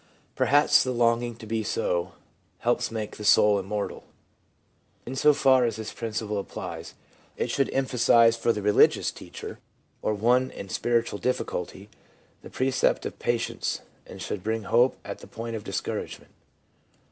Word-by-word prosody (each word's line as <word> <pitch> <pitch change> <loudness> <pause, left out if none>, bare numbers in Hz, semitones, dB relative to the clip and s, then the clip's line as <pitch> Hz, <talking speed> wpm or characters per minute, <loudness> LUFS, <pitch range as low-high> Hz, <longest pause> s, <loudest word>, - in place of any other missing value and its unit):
1 - - -33 0.3
Perhaps 145 +1 +4
the 130 - -3
longing 120 0 +1
to 115 - -11
be 110 +1 -1
so 90 -5 -1 0.5
Helps 120 +1 +1
make 110 -2 -5
the 105 - -7
soul 105 -1 +5
immortal.' 100 +2 -4 1.0
In 130 - -5
so 150 +3 +5
far 135 -3 +4
as 115 -3 0
this 110 0 -6
principle 110 -2 -3
applies, 100 - -7 0.4
it - - -1
should 135 - +1
emphasise 120 -3 +4
for 115 0 +1
the 105 -3 -3
religious 105 0 +4
teacher, - - -9 0.4
or 110 - 0
one 125 +5 +2
in 100 - -9
spiritual 115 0 0
difficulty, 105 -5 -3 0.5
the - - -11
precept 130 0 +1
of - - -6
patience, - - -1 0.3
and - - -9
should 100 - -4
bring 110 0 -1
hope 120 +5 +3
at - - -6
the - - -12
point 115 0 -6
of 110 - -6
discouragement. - - -5
115 Hz, 155 wpm, -26 LUFS, 105-125 Hz, 1.0 s, soul